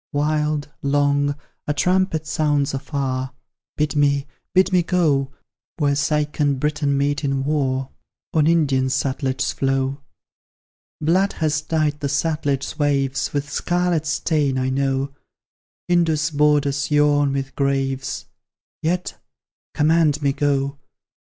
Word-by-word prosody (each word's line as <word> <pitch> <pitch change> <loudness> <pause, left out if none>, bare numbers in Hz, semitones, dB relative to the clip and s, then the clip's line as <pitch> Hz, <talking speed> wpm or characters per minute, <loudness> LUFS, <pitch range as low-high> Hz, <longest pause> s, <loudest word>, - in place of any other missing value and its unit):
Wild, 150 0 0
long, 145 0 +1 0.3
a 150 - 0
trumpet 180 -2 +1
sounds 145 -3 0
afar; 135 -1 -3 0.4
Bid 150 0 0
me 140 -1 +2 0.3
bid 190 0 +3
me 180 - +5
go 150 -6 +1 0.5
Where 145 -3 +2
Seik 150 +1 0
and 140 -2 +2
Briton 145 -1 0
meet 145 +2 0
in 135 -1 0
war, 135 -2 -1 0.4
On 155 -2 +3
Indian 145 -6 +3
Sutlej's 130 0 -1
flow. 135 +1 -1 1.0
Blood 180 +6 +2
has 155 -1 0
dyed 155 -1 0
the 140 - -2
Sutlej's 145 -1 -1
waves 135 -2 0
With 145 0 -2
scarlet 175 -1 0
stain, 150 -4 0
I 130 0 0
know; 135 0 0 0.7
Indus' 165 -3 +2
borders 145 -1 +2
yawn 145 -1 +3
with 135 -1 -3
graves, 135 -1 -1 0.6
Yet, 180 +3 -2 0.6
command 155 -1 +3
me 140 -1 +2
go! 140 -1 0
145 Hz, 120 wpm, -21 LUFS, 140-155 Hz, 1.0 s, me